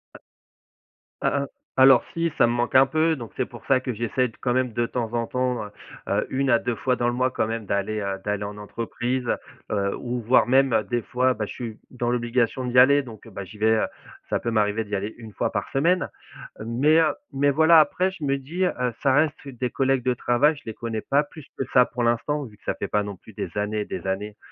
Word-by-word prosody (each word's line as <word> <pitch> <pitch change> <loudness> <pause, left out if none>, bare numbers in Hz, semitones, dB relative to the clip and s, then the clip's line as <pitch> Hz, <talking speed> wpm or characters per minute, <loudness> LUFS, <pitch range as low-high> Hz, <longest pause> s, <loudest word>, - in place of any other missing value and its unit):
A - - -11 1.0
a 140 0 +1
a - - -3 0.3
alors, 130 -2 +7
si, 170 -1 0
ça - - +5
me 120 - 0
manque 120 +1 -1
un 130 +1 +8
peu. 155 +3 +1
Donc, 115 -4 -9
c'est 130 - 0
pour 120 -2 -13
ça 130 -1 +3
que 125 - -3
j'essaie 120 +3 0
d - - -19
quand 125 - 0
même, 130 -1 +1
de 120 +2 0
temps 115 -1 -3
en 115 -1 -1
temps, 125 -3 -1
heu, - - -9 0.4
heu, - - +1
1 135 0 0
à 120 - +6
2 120 0 -2
fois 125 +3 0
dans 120 - 0
le - - -2
mois 130 +1 +1
quand 110 - 0
même 115 -1 -4
d'aller, 100 +2 -1
heu, 100 -1 -2
d'aller 105 0 -2
en 105 0 -6
entreprise, 120 +4 -3
heu, - - +2 0.4
heu, 100 -1 0
ou 125 0 -3
voire 120 +3 +4
même 130 -3 +4
des 120 -1 0
fois, 125 +3 +1
bah, 105 -2 -3
je - - -9
suis 115 -3 -7
dans 120 -2 -2
l'obligation 120 +1 0
d'y 125 0 +3
aller. 140 +3 +6
Donc, 115 -3 -12
bah, 100 -2 -7
j'y 105 - -12
vais, 110 +1 +3
heu, 110 - +2 0.4
ça - - +1
peut 115 - -2
m'arriver 105 0 +1
d'y 105 0 -3
aller 100 +3 -4
1 110 -3 -11
fois - - -1
par - - -3
semaine. 170 +7 +2 0.6
Mais, 140 +8 +3
heu, 155 -2 +2 0.2
mais, 145 +1 +2
voilà, 160 +2 +7
après, 180 +5 +1
je 185 -5 -10
me 140 -1 +1
dis, 160 +8 -3
heu, 180 - +2 0.3
ça 135 - +4
reste 150 +1 +1
des 125 -2 -3
collègues 135 -1 +1
de 125 - +3
travail. 125 +6 +2
Je 145 - -14
les 110 - -5
connais 115 -1 -4
pas 140 +6 +2
plus 150 0 -13
que 135 - -2
ça, 125 -1 +7
pour 120 0 -4
l'instant, 130 +5 0
vu 105 -4 -13
que - - -31
ça - - -2
fait - - -4
pas 105 - +1
non 100 -1 -6
plus - - -16
des - - -4
années 105 +1 -1
et - - -3
des - - -6
années, 105 +2 -3
125 Hz, 250 wpm, -24 LUFS, 110-135 Hz, 1.0 s, un